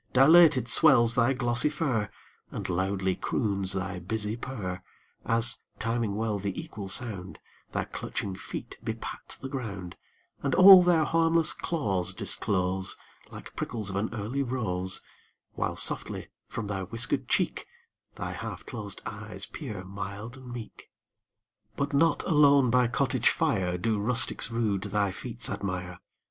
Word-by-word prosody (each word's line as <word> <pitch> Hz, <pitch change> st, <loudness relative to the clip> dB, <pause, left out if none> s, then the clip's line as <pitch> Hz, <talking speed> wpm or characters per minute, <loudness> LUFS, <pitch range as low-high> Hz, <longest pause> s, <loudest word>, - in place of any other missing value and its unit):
Dilated 135 Hz, -2 st, +6 dB
swells 120 Hz, -4 st, +5 dB
thy 125 Hz, +2 st, +3 dB
glossy 120 Hz, +1 st, +2 dB
fur, 135 Hz, -9 st, -1 dB, 0.4 s
And -, -, -5 dB
loudly 95 Hz, +1 st, 0 dB
croons 100 Hz, -5 st, -1 dB
thy 95 Hz, -1 st, -3 dB
busy 105 Hz, +4 st, -3 dB
purr, 105 Hz, -8 st, -5 dB, 0.5 s
As, 115 Hz, +1 st, +3 dB, 0.2 s
timing 115 Hz, -2 st, -1 dB
well 110 Hz, -1 st, -1 dB
the 100 Hz, -1 st, -3 dB
equal 100 Hz, -2 st, -7 dB
sound, 95 Hz, -4 st, -1 dB, 0.3 s
Thy -, -, -1 dB
clutching 100 Hz, -, -4 dB
feet -, -, -7 dB
bepat -, -, -6 dB
the 135 Hz, -, -4 dB
ground, 100 Hz, -10 st, -6 dB, 0.5 s
And 140 Hz, -2 st, 0 dB
all 190 Hz, 0 st, +10 dB
their 175 Hz, -3 st, +4 dB
harmless 165 Hz, 0 st, +2 dB
claws 95 Hz, -, -1 dB
disclose 95 Hz, -2 st, -1 dB, 0.3 s
Like -, -, -11 dB
prickles 110 Hz, -4 st, -4 dB
of -, -, -5 dB
an 100 Hz, +3 st, -1 dB
early 115 Hz, +5 st, -3 dB
rose, 95 Hz, -8 st, -2 dB, 0.5 s
While -, -, -2 dB
softly -, -, -1 dB, 0.2 s
from 115 Hz, 0 st, -5 dB
thy 100 Hz, -2 st, -3 dB
whiskered 115 Hz, +6 st, -1 dB
cheek -, -, 0 dB, 0.5 s
Thy -, -, -4 dB
half -, -, -6 dB
closed -, -, -7 dB
eyes -, -, -6 dB
peer, 100 Hz, -4 st, -7 dB
mild 100 Hz, +4 st, -7 dB
and 130 Hz, -2 st, -11 dB
meek. 120 Hz, -2 st, -9 dB, 0.9 s
But 140 Hz, +1 st, -2 dB
not 150 Hz, +1 st, +3 dB
alone 140 Hz, -5 st, +5 dB
by 125 Hz, 0 st, +4 dB
cottage 130 Hz, 0 st, +2 dB
fire 95 Hz, -, 0 dB
Do 110 Hz, +2 st, 0 dB
rustics 115 Hz, +4 st, +3 dB
rude 110 Hz, -4 st, 0 dB
thy 100 Hz, -1 st, 0 dB
feats 120 Hz, +5 st, -3 dB
admire. 90 Hz, -2 st, -4 dB
115 Hz, 140 wpm, -28 LUFS, 95-130 Hz, 0.9 s, all